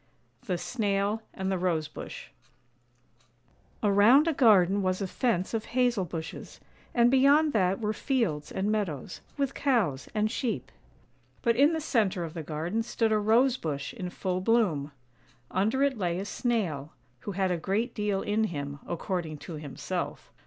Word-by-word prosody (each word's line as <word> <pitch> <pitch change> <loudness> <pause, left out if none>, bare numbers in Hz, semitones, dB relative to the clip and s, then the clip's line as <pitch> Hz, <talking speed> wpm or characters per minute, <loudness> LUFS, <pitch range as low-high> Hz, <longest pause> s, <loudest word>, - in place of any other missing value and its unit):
THE 180 -3 0
SNAIL 205 0 -1
AND 190 0 -3
THE 190 - 0
ROSE 165 -4 0
BUSH - - -9 1.5
AROUND 215 +9 +6
a 330 - +2
garden 200 -7 +5
was 185 -1 0
a 200 - -1
fence 190 -1 -1
of 220 -1 -1
hazel 245 -6 +2
bushes, 165 -1 -7 0.4
and 240 0 +5
beyond 285 +3 +5
that 190 -3 +2
were 215 -1 -1
fields 215 - -1
and 200 +2 -1
meadows, 185 - -3 0.2
with 275 -1 0
cows 215 - 0
and 215 0 +1
sheep; 245 -2 -3 0.7
but 235 -2 +3
in 285 +6 +5
the 320 - 0
centre 215 - +1
of 160 -2 -6
the 165 - -5
garden 160 +8 -2
stood 225 -1 0
a 215 - +3
Rose 235 +5 +3
bush 145 - -4
in 180 - -5
full 185 0 -2
bloom. 185 -10 +2 0.6
Under 220 +8 +1
it 275 -5 +1
lay 175 -2 0
a 195 - -3
Snail, 185 - -2 0.3
who 205 - -6
had 190 0 0
a 175 - +1
great 210 +8 -1
deal 210 -2 -1
in 215 +1 +1
him, 145 -6 -5
according 170 -2 -3
to 165 - -9
himself. 150 -2 -5
200 Hz, 160 wpm, -28 LUFS, 175-235 Hz, 1.5 s, AROUND